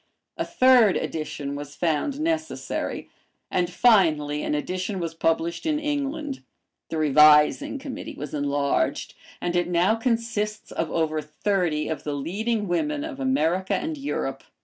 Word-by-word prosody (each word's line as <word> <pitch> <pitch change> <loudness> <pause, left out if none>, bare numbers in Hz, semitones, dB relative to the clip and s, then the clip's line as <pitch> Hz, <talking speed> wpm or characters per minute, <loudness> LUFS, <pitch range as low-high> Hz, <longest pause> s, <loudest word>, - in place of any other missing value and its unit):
A - - -2
third 250 -6 +5
edition 145 -3 -4
was 145 0 -7
found 175 - -1
necessary, 320 0 -2 0.4
and 180 -1 +1
finally 160 -9 +3
an - - -1
edition 185 +5 -3
was 165 -2 -3
published 165 +1 0
in 305 -1 +2
England. 295 -1 -3 0.5
The 160 - -3
Revising 150 - +5
Committee 270 -1 -7
was 150 +2 -7
enlarged, 145 -1 0 0.3
and 175 0 -2
it 175 - +2
now 175 +4 +3
consists 225 -2 -2
of 165 - -2
over 155 -1 0
thirty 155 0 -1
of 160 - -4
the 150 - -3
leading 205 +9 -2
women 295 - -1
of 305 -4 -6
America 190 - +1
and 320 0 -2
Europe. 285 0 -3
180 Hz, 140 wpm, -25 LUFS, -, 0.5 s, third